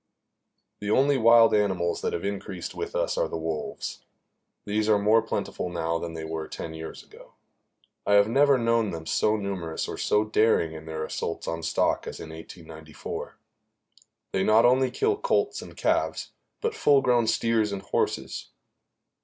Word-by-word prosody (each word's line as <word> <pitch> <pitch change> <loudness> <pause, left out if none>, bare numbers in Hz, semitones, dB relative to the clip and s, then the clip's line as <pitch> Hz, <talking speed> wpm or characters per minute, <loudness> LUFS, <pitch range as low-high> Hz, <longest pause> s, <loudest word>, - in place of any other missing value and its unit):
The 105 - -4
only 140 +6 +4
wild 115 0 +6
animals 95 -5 +1
that - - -1
have 85 - -3
increased 95 -3 -5
with - - -5
us - - 0
are - - +1
the - - -4
wolves. 80 -2 -5 0.6
These 105 +1 0
are 105 - +5
more 105 +3 +4
plentiful 90 - -3
now 85 -1 -1
than 85 -1 -6
they 80 -1 -5
were 80 0 -4
ten 80 - -7
years 80 0 -8
ago. - - -17 0.7
I 100 - +1
have 100 0 +6
never 140 +3 +4
known 115 -2 +1
them 80 -2 -6
so 105 +6 +2
numerous 95 -6 -3
or - - -6
so 105 +1 +2
daring 105 -6 +2
in 80 0 -10
their 80 -1 -4
assaults 85 - -4
on 85 0 -3
stock 80 - 0
as - - -6
in 80 - -8
1894. 80 -1 -9 1.0
They 95 - +1
not 110 +3 +5
only 130 +1 +4
kill 420 0 0
colts 430 -3 0
and - - -12
calves, - - 0 0.3
but 455 0 -1
full 140 - +4
grown 120 -3 +3
steers 110 -2 +1
and 100 -1 -5
horses. - - -2
100 Hz, 170 wpm, -26 LUFS, 80-115 Hz, 1.0 s, wild